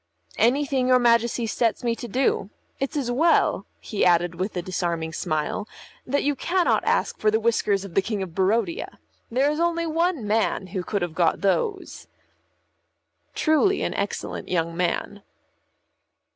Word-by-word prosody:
"Anything 265 +1 +2
your 255 0 +6
Majesty 235 -1 +2
sets 225 +1 0
me 235 -1 +1
to 240 - -6
do. 245 -4 0 0.3
It's 275 +3 -2
as 255 -4 -1
well," 325 +7 +2
he 210 - -2
added 175 -1 +3
with 185 +3 -4
a 175 - -2
disarming 170 -3 -2
smile, 155 +5 -2 0.4
"that 280 +3 0
you 290 - +2
cannot 355 +6 +1
ask - - 0
for 215 - +3
the 220 +1 +2
whiskers 210 -3 +1
of 190 - -10
the 195 - +3
King 205 0 -3
of 175 -3 -8
Barodia. 190 0 0 0.3
There 265 +5 +2
is 300 - -3
only 335 0 +1
one 330 -5 0
man 210 -2 0
who 190 - -1
could 200 +1 -2
have 175 -2 -3
got 165 -1 +1
those." 385 - -1 1.3
Truly 315 +5 +2
an - - -1
excellent - - -4
young 165 -1 -1
man. 180 +3 -2
225 Hz, 160 wpm, -24 LUFS, 185-275 Hz, 1.3 s, your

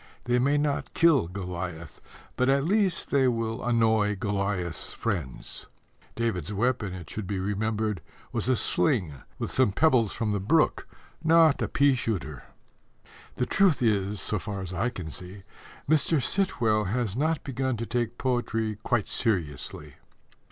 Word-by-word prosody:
They 125 0 +1
may 140 +4 +2
not 145 -1 -1
kill 160 - +4
Goliath, 90 -3 -6 0.3
but 130 +1 +2
at 135 0 +3
least 190 0 +1
they 135 -2 +4
will 115 -1 -1
annoy 110 -3 +2
Goliath's 100 -4 -2
friends. 85 - -4 0.5
David's 105 -7 -2
weapon, 110 -1 0
it 90 -4 -9
should 105 +2 -5
be 100 - -2
remembered, 105 0 -1 0.3
was - - 0
a 130 - +4
sling, 110 - +1 0.2
with - - -4
some 130 -6 +3
pebbles 120 -3 +3
from 110 -3 -1
the 100 - 0
brook, 150 +11 +2 0.4
not 165 -2 +5
a - - +1
pea 140 0 +3
shooter. 85 - -3 0.9
The 125 - 0
truth 180 -3 +3
is, 105 -2 +1
so 105 - -1
far 100 0 -4
as 95 -1 -6
I 115 +7 0
can 90 -9 -7
see, 95 +4 -8 0.4
Mr. 155 +1 +3
Sitwell 120 - +1
has 110 0 -1
not 155 +3 0
begun 130 -2 -2
to 115 - -3
take 120 -1 -2
poetry 115 -4 -1
quite 110 -2 0
seriously. 85 - -2
110 Hz, 150 wpm, -27 LUFS, 95-130 Hz, 0.9 s, not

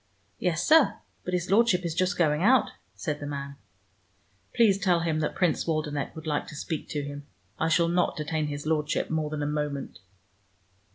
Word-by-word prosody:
"Yes, 175 -1 0
sir. 315 -3 +6 0.3
But 180 - -2
his 180 +1 -2
Lordship 200 -4 +4
is 165 - -1
just 180 +1 0
going 150 -2 +2
out," 245 +5 +4 0.2
said 150 -4 -3
the 145 - -5
man. 140 -1 -5 0.9
"Please 215 -5 +4
tell 180 -3 +2
him 160 -2 0
that 150 - -2
Prince 180 -3 +1
Waldenech 155 -3 -2
would 160 0 -9
like 150 -2 -1
to - - -9
speak 155 +1 -4
to 145 -1 -2
him. 145 0 -7 0.3
I 160 - +1
shall 170 +1 +3
not 175 +1 +1
detain 155 0 -1
his 145 0 -5
Lordship 155 -1 0
more 155 -1 0
than 150 -1 -3
a - - -1
moment!" 150 -2 -3
160 Hz, 185 wpm, -27 LUFS, 150-180 Hz, 0.9 s, sir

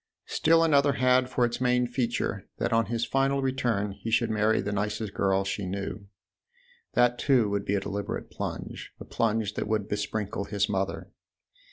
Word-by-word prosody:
Still 165 +1 +3
another 145 -3 +4
had 125 +1 +3
for 125 -1 +2
its 120 +1 -3
main 125 0 +3
feature 120 -5 -2
that 120 - -1
on 115 0 +3
his 115 0 -1
final 135 +1 +1
return 120 -6 0
he 105 +3 -6
should 115 0 +2
marry 110 +1 +2
the 105 - -2
nicest 105 +1 -2
girl 95 0 +1
she 95 0 -3
knew: 100 +1 -5 0.9
that 120 0 +3
too 125 -7 +3
would 100 0 -1
be 100 - 0
a - - +2
deliberate 100 0 -4
plunge, - - -6
a - - -8
plunge 110 -2 0
that - - -3
would 105 -2 0
besprinkle 105 -1 -2
his 100 0 0
mother. 95 -1 -2
110 Hz, 175 wpm, -27 LUFS, 100-125 Hz, 0.9 s, another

